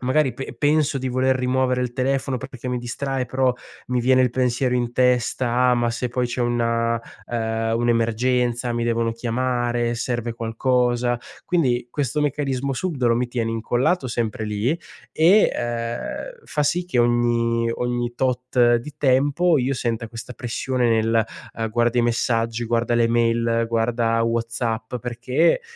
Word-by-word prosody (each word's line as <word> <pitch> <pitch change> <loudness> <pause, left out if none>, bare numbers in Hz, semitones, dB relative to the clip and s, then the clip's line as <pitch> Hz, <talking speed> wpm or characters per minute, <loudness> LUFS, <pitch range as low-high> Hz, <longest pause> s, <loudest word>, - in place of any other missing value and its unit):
magari 130 +1 +2
pe 130 +1 -7
penso 145 +1 +2
di 130 -1 -2
voler 130 +1 +2
rimuovere 130 0 +1
il 125 -1 -3
telefono, 135 0 0
pe 130 - -6
pe 135 - -12
che 125 - -5
mi 125 -1 -1
distrae, 130 +2 -3
però 130 0 +1 0.4
mi 125 - 0
viene 130 +1 +4
il 125 - +2
pensiero 125 0 +1
in 120 -1 -1
testa: 125 0 +2
“Ma 120 -1 +1
se 120 +2 -2
poi 125 +1 -1
c'è 120 +1 -4
una, 115 -1 +1 0.3
ehm, 115 -1 -1
un'emergenza, 120 +1 +1
mi 120 0 -1
devono 115 -1 +1
chiamare, 120 0 -1
serve 120 -1 -2
qualcosa?”. 120 +1 0 0.3
Quindi 125 -9 +1
questo 145 +1 -1
meccanismo 140 -2 -1
subdolo 130 -9 0
mi 125 - 0
tiene 120 -2 -2
incollato 120 +7 0
sempre 115 -2 -2
lì 105 +4 -1 0.4
e, 185 +7 +5
ehm, 120 - -4
fa 150 - -1
sì 175 +5 +1
che 175 -8 -2
ogni 120 -1 +2
ogni 120 0 -2
tot 125 -1 +2
di 140 +5 -7
tempo 145 +4 +3
io 130 +2 0
senta 115 -2 -2
questa 115 +1 -8
pressione 125 +1 -1
nel, 115 0 +2 0.3
uhm, 115 -1 -2
guarda 120 +1 +1
i 120 - +4
messaggi, 115 0 0
guarda 120 0 +1
le 115 -1 +3
mail, 115 0 +2
guarda 115 0 +1
WhatsApp, 115 0 -2
perché, 125 - +1
120 Hz, 155 wpm, -22 LUFS, 115-130 Hz, 0.4 s, e